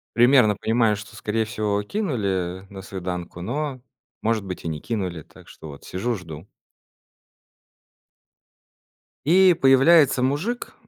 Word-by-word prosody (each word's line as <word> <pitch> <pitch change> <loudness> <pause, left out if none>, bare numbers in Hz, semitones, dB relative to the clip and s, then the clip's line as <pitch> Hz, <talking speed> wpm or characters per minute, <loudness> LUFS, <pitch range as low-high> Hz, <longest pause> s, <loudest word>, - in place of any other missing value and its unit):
примерно 120 -3 +5
понимаю, 110 0 +1
что, 105 +2 -11
скорее 110 +1 -2
всего, 105 -2 -1
кинули, 100 - -2
э, - - -17
на 95 -1 -9
свиданку, 90 -2 -6
но, 135 +5 -3 0.4
может 110 -2 0
быть, 90 -2 -7
и - - -2
не 75 -2 -4
кинули, 95 -8 -4
так - - -18
что 80 - -12
вот 70 - -12
сижу, 115 +6 -3
жду. 85 -1 -10 2.8
И 185 +3 +6
появляется 135 -1 +5
мужик, 165 - -2
110 Hz, 125 wpm, -23 LUFS, 95-135 Hz, 2.8 s, И